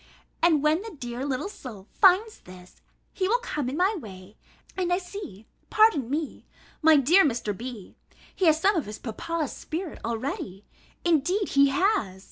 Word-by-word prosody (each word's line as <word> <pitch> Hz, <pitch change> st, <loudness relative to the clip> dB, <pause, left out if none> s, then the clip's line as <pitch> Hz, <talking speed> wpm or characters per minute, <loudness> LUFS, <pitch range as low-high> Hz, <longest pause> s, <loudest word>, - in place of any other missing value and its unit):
And 320 Hz, -4 st, +3 dB
when 310 Hz, +3 st, +2 dB
the 450 Hz, -, -7 dB
dear 240 Hz, 0 st, -5 dB
little 270 Hz, +7 st, -2 dB
soul 235 Hz, -, -10 dB
finds 405 Hz, +3 st, +3 dB
this, 180 Hz, 0 st, -15 dB, 0.3 s
he 375 Hz, -, -1 dB
will 460 Hz, +5 st, +3 dB
come 300 Hz, -, -3 dB
in 275 Hz, -, -4 dB
my 375 Hz, +4 st, +2 dB
way, 200 Hz, -, -10 dB, 0.4 s
(and 360 Hz, -2 st, -1 dB
I 355 Hz, -, +3 dB
see, 355 Hz, -, -9 dB, 0.2 s
pardon 430 Hz, -, +3 dB
me, 300 Hz, +1 st, -4 dB, 0.3 s
my 320 Hz, 0 st, +6 dB
dear 330 Hz, +9 st, +5 dB
Mr. 235 Hz, -7 st, -1 dB
B., 230 Hz, -2 st, -8 dB, 0.4 s
he 375 Hz, -, 0 dB
has 315 Hz, -1 st, +5 dB
some 400 Hz, +5 st, +3 dB
of 320 Hz, -10 st, -1 dB
his 210 Hz, 0 st, -7 dB
papa's 305 Hz, +7 st, -4 dB
spirit, 330 Hz, 0 st, -6 dB
already, 225 Hz, -4 st, -4 dB, 0.4 s
indeed 350 Hz, +5 st, +1 dB
he 280 Hz, 0 st, +4 dB
has!) 275 Hz, -, 0 dB
300 Hz, 165 wpm, -26 LUFS, 235-370 Hz, 0.4 s, my